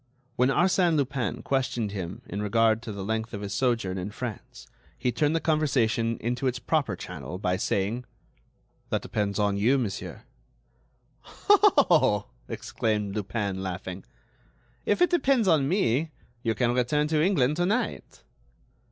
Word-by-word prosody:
When 125 Hz, +2 st, +3 dB
Arsène 175 Hz, +2 st, +3 dB
Lupin 135 Hz, -4 st, -1 dB
questioned 125 Hz, -5 st, -1 dB
him 95 Hz, -3 st, -6 dB
in 100 Hz, -, -5 dB
regard 110 Hz, +1 st, +2 dB
to 120 Hz, -, -6 dB
the 100 Hz, -1 st, -6 dB
length 110 Hz, +1 st, -2 dB
of 100 Hz, -, -6 dB
his 100 Hz, -1 st, -4 dB
sojourn 110 Hz, -6 st, 0 dB
in 90 Hz, +3 st, -4 dB
France 110 Hz, 0 st, -7 dB, 0.3 s
he 125 Hz, -, 0 dB
turned 150 Hz, +6 st, +1 dB
the -, -, +2 dB
conversation 125 Hz, -8 st, +1 dB
into 120 Hz, +3 st, -1 dB
its 125 Hz, 0 st, 0 dB
proper 140 Hz, -, 0 dB
channel 90 Hz, 0 st, -7 dB
by 90 Hz, -1 st, 0 dB
saying: 110 Hz, +4 st, -1 dB, 0.8 s
"That -, -, -1 dB
depends 100 Hz, -2 st, -2 dB
on 100 Hz, -1 st, +1 dB
you, 120 Hz, +7 st, +3 dB
monsieur." 110 Hz, -7 st, -4 dB, 1.2 s
"Oh!" 285 Hz, -, +5 dB, 0.2 s
exclaimed 105 Hz, -3 st, -2 dB
Lupin, 100 Hz, -2 st, -2 dB
laughing, 95 Hz, 0 st, -5 dB, 0.8 s
"if 205 Hz, -, +3 dB
it 355 Hz, -, +2 dB
depends 275 Hz, -, +3 dB
on 150 Hz, -6 st, +3 dB
me 160 Hz, -, +1 dB, 0.3 s
you 115 Hz, -1 st, 0 dB
can 120 Hz, +1 st, +1 dB
return 135 Hz, +5 st, +1 dB
to 155 Hz, -1 st, +2 dB
England 150 Hz, -6 st, +2 dB
to 175 Hz, 0 st, +1 dB
night." 225 Hz, +4 st, -2 dB
120 Hz, 145 wpm, -27 LUFS, 105-150 Hz, 1.2 s, Oh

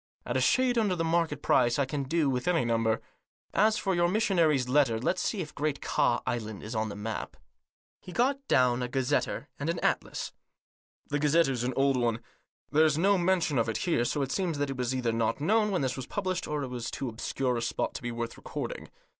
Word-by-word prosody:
At -, -, -3 dB
a -, -, +2 dB
shade 255 Hz, -2 st, +3 dB
under 205 Hz, -5 st, +1 dB
the 165 Hz, -, -1 dB
market 165 Hz, -3 st, 0 dB
price, 120 Hz, -1 st, +3 dB
I 140 Hz, -, +2 dB
can 140 Hz, +1 st, -3 dB
do 155 Hz, +2 st, +1 dB
with 125 Hz, +1 st, -1 dB
any 170 Hz, -7 st, +2 dB
number. 115 Hz, -1 st, +1 dB, 0.5 s
As 215 Hz, +2 st, +3 dB
for 195 Hz, -4 st, 0 dB
your 175 Hz, -1 st, +3 dB
missionary's 170 Hz, -, +2 dB
letter, 130 Hz, -3 st, +3 dB
let's 130 Hz, -, 0 dB
see 210 Hz, -, -1 dB
if 155 Hz, -, -7 dB
Great 150 Hz, -1 st, -1 dB
Ka -, -, +1 dB
Island 110 Hz, -4 st, -3 dB
is 110 Hz, -, -6 dB
on 110 Hz, -1 st, -1 dB
the 100 Hz, -, -6 dB
map." 110 Hz, +2 st, -5 dB, 0.6 s
He 180 Hz, -, -10 dB
got 265 Hz, +7 st, +1 dB
down 125 Hz, -1 st, +3 dB
a 125 Hz, -, -1 dB
gazetteer 135 Hz, +3 st, -1 dB
and 145 Hz, +3 st, -2 dB
an 170 Hz, -, 0 dB
atlas. -, -, -1 dB, 0.4 s
" -, -, -44 dB
The 145 Hz, -, +1 dB
gazetteer's 145 Hz, -4 st, +2 dB
an 125 Hz, +1 st, -1 dB
old 135 Hz, -1 st, +3 dB
one. 120 Hz, -2 st, +1 dB, 0.5 s
There's 155 Hz, 0 st, +4 dB
no 195 Hz, +3 st, +3 dB
mention 175 Hz, -6 st, +2 dB
of 115 Hz, -, +1 dB
it 110 Hz, -, -1 dB
here, 165 Hz, -9 st, +2 dB
so 140 Hz, +4 st, 0 dB
it 135 Hz, -, -4 dB
seems 180 Hz, -6 st, -1 dB
that 145 Hz, -1 st, -1 dB
it -, -, -4 dB
was 125 Hz, 0 st, -1 dB
either 125 Hz, -3 st, 0 dB
not 115 Hz, +2 st, 0 dB
known 210 Hz, +8 st, +2 dB
when 185 Hz, -5 st, 0 dB
this 130 Hz, -1 st, -1 dB
was 130 Hz, -, -6 dB
published, 185 Hz, -3 st, -2 dB
or 150 Hz, -1 st, -2 dB
it 130 Hz, -, -4 dB
was 125 Hz, -2 st, -4 dB
too 135 Hz, -, -4 dB
obscure 125 Hz, +2 st, -2 dB
a -, -, -2 dB
spot 115 Hz, -, -2 dB
to -, -, -6 dB
be 120 Hz, -1 st, -3 dB
worth 115 Hz, 0 st, -4 dB
recording. -, -, -6 dB
140 Hz, 225 wpm, -29 LUFS, 120-170 Hz, 0.6 s, There's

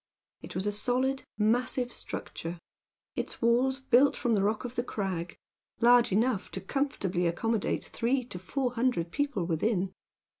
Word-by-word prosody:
It -, -, -9 dB
was 185 Hz, +2 st, -1 dB
a 205 Hz, -, +1 dB
solid, 255 Hz, +5 st, 0 dB
massive 245 Hz, +3 st, +1 dB
structure; 170 Hz, +2 st, -6 dB, 0.6 s
its -, -, -3 dB
walls 250 Hz, +3 st, +3 dB
built 265 Hz, +2 st, +4 dB
from 240 Hz, -, +1 dB
the 205 Hz, -, +3 dB
rock 210 Hz, +4 st, 0 dB
of 245 Hz, 0 st, -6 dB
the 240 Hz, -, +1 dB
crag; 185 Hz, -7 st, -3 dB, 0.4 s
large 240 Hz, 0 st, +6 dB
enough 220 Hz, +1 st, +1 dB
to -, -, -3 dB
comfortably 190 Hz, -8 st, -1 dB
accommodate 220 Hz, +5 st, 0 dB
three 250 Hz, +3 st, 0 dB
to 180 Hz, -7 st, -7 dB
four 250 Hz, +7 st, -1 dB
hundred 230 Hz, -9 st, 0 dB
people 280 Hz, -, -1 dB
within. 185 Hz, +3 st, 0 dB
230 Hz, 150 wpm, -29 LUFS, 190-255 Hz, 0.6 s, large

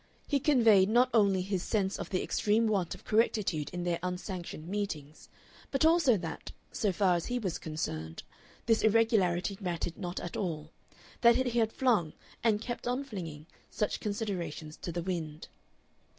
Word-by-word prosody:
He 285 Hz, -, +2 dB
conveyed 225 Hz, -9 st, +5 dB
not 245 Hz, +3 st, +4 dB
only 200 Hz, -5 st, +4 dB
his 190 Hz, -1 st, -2 dB
sense 195 Hz, -1 st, -1 dB
of -, -, -5 dB
the 185 Hz, -, 0 dB
extreme 215 Hz, +2 st, +2 dB
want 200 Hz, -6 st, 0 dB
of -, -, -16 dB
correctitude 205 Hz, -8 st, +1 dB
in 175 Hz, 0 st, -4 dB
their 175 Hz, -1 st, 0 dB
unsanctioned 180 Hz, -3 st, -5 dB
meetings, 160 Hz, -7 st, -4 dB, 0.4 s
but 275 Hz, +2 st, +1 dB
also 320 Hz, -8 st, +5 dB
that, 170 Hz, -3 st, -6 dB, 0.2 s
so 210 Hz, -4 st, 0 dB
far 185 Hz, -1 st, +3 dB
as 170 Hz, -, -2 dB
he 245 Hz, -, -1 dB
was 190 Hz, -8 st, -2 dB
concerned, 80 Hz, -, -4 dB, 0.4 s
this 225 Hz, -1 st, +3 dB
irregularity 205 Hz, -4 st, +2 dB
mattered 175 Hz, -2 st, -3 dB
not 175 Hz, 0 st, -4 dB
at 175 Hz, -, -6 dB
all, 160 Hz, -5 st, -3 dB, 0.5 s
that 235 Hz, -1 st, +7 dB
he 245 Hz, -2 st, +1 dB
had 220 Hz, -1 st, +2 dB
flung 220 Hz, -13 st, +1 dB, 0.3 s
and 215 Hz, -2 st, +3 dB
kept 240 Hz, -1 st, -5 dB
on 250 Hz, +3 st, 0 dB
flinging 165 Hz, -, -7 dB, 0.2 s
such 210 Hz, -, -1 dB
considerations 180 Hz, -8 st, -4 dB
to 175 Hz, -, -5 dB
the 170 Hz, 0 st, -3 dB
wind. 160 Hz, -4 st, -4 dB
195 Hz, 165 wpm, -31 LUFS, 170-225 Hz, 0.5 s, that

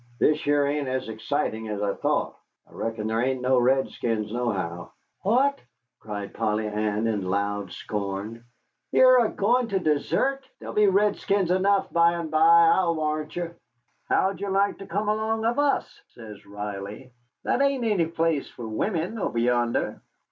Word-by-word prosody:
"This 150 Hz, +4 st, +2 dB
here 145 Hz, 0 st, +2 dB
ain't 145 Hz, 0 st, -1 dB
as 130 Hz, -2 st, -3 dB
excitin' 110 Hz, 0 st, -2 dB
as 105 Hz, -1 st, -3 dB
I 100 Hz, -1 st, 0 dB
thought. -, -, -1 dB, 0.3 s
I -, -, -21 dB
reckon 110 Hz, -1 st, -4 dB
there 110 Hz, +1 st, 0 dB
ain't 130 Hz, 0 st, -1 dB
no 130 Hz, 0 st, +3 dB
redskins 120 Hz, -4 st, 0 dB
nohow." 95 Hz, -8 st, -3 dB, 0.3 s
"What!" 265 Hz, +7 st, +2 dB, 0.4 s
cried 105 Hz, -2 st, -6 dB
Polly 110 Hz, -1 st, -1 dB
Ann, 105 Hz, +1 st, -1 dB
in 105 Hz, -3 st, -1 dB
loud 100 Hz, -1 st, -2 dB
scorn, 105 Hz, +3 st, -5 dB, 0.5 s
"ye're 255 Hz, -1 st, +6 dB
a 220 Hz, -, 0 dB
goin' 240 Hz, +4 st, +1 dB
to 200 Hz, -3 st, -1 dB
desert? 190 Hz, -, 0 dB
There'll -, -, -8 dB
be 210 Hz, -1 st, +4 dB
redskins 200 Hz, -1 st, +2 dB
enough 195 Hz, +2 st, +2 dB
by 170 Hz, 0 st, +4 dB
and 170 Hz, -2 st, -4 dB
by, 165 Hz, +1 st, +6 dB
I'll 175 Hz, -3 st, +1 dB
warrant 155 Hz, -1 st, -2 dB
ye." 175 Hz, -1 st, -3 dB, 0.6 s
"How'd 190 Hz, +1 st, +1 dB
you 200 Hz, -, -2 dB
like 195 Hz, +1 st, +1 dB
to 195 Hz, -, -9 dB
come 205 Hz, +4 st, -2 dB
along 220 Hz, +1 st, 0 dB
of 240 Hz, +4 st, +1 dB
us," 290 Hz, -1 st, 0 dB
says 110 Hz, -3 st, -11 dB
Riley; 105 Hz, +4 st, -7 dB, 0.3 s
"that -, -, +1 dB
ain't 275 Hz, -3 st, +1 dB
any 205 Hz, -8 st, +1 dB
place 165 Hz, -3 st, -1 dB
for 120 Hz, -, -8 dB
wimmen, 175 Hz, -, -2 dB
over 120 Hz, -, -2 dB
yonder." 120 Hz, 0 st, 0 dB
145 Hz, 160 wpm, -25 LUFS, -, 0.6 s, ye're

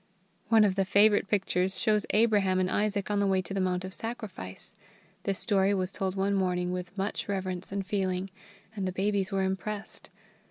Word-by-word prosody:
One 225 Hz, -1 st, +6 dB
of 200 Hz, -2 st, +3 dB
the 195 Hz, 0 st, +1 dB
favourite 205 Hz, +2 st, +4 dB
pictures 190 Hz, -2 st, 0 dB
shows 215 Hz, -2 st, +2 dB
Abraham 205 Hz, -4 st, +3 dB
and 185 Hz, 0 st, 0 dB
Isaac 205 Hz, -1 st, 0 dB
on 205 Hz, -, +1 dB
the 200 Hz, -, +2 dB
way 190 Hz, -1 st, +2 dB
to 180 Hz, -, -6 dB
the 195 Hz, -, -1 dB
mount 185 Hz, 0 st, 0 dB
of 190 Hz, -, -6 dB
sacrifice. 205 Hz, -, -6 dB, 0.5 s
This 195 Hz, -1 st, 0 dB
story 200 Hz, -2 st, +2 dB
was 185 Hz, -1 st, -1 dB
told 190 Hz, -1 st, -2 dB
one 195 Hz, +1 st, +1 dB
morning 180 Hz, -2 st, 0 dB
with 180 Hz, +2 st, -5 dB
much 195 Hz, +1 st, -2 dB
reverence 190 Hz, -2 st, -2 dB
and 195 Hz, -1 st, -2 dB
feeling, 190 Hz, -1 st, -1 dB, 0.4 s
and 195 Hz, -3 st, -2 dB
the -, -, -1 dB
babies 195 Hz, 0 st, 0 dB
were 195 Hz, -1 st, +1 dB
impressed. 200 Hz, +2 st, -4 dB
195 Hz, 190 wpm, -29 LUFS, 185-205 Hz, 0.5 s, One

